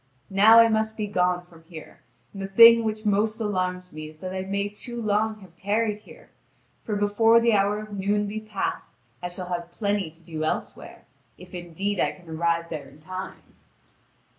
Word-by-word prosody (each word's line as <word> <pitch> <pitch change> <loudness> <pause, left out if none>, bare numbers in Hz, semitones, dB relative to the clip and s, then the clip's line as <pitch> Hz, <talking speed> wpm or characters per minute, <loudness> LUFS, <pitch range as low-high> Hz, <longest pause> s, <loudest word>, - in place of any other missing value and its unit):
Now 210 +4 +7
I 230 0 +8
must 220 0 0
be 215 - -1
gone 180 -3 0
from 165 -2 -18
here, 165 -2 -12 0.3
and 195 - -7
the 195 - -3
thing 230 +3 +8
which 215 0 -3
most 215 +2 +1
alarms 185 -4 -2
me 155 0 -8
is 155 - -16
that 185 +3 -6
I 190 - -3
may 200 +1 -2
too 235 +4 -8
long 215 0 0
have 180 -3 -16
tarried 210 +3 -1
here, - - -17 0.5
for 210 - -3
before 205 +3 +4
the 230 0 +3
hour 205 0 +2
of 215 -1 -11
noon 205 +1 0
be 210 +2 -4
passed 215 -2 -4 0.3
I 175 - -4
shall 180 0 -7
have 175 -1 -4
plenty 200 -2 -1
to 165 +1 -22
do 160 -2 -6
elsewhere, 155 - -4 0.3
if 180 +1 -14
indeed 180 +3 -3
I - - +1
can 180 -2 -18
arrive 170 +1 -1
there 155 -3 -6
in 150 - -18
time." 185 +4 -8
200 Hz, 190 wpm, -25 LUFS, 175-215 Hz, 0.5 s, I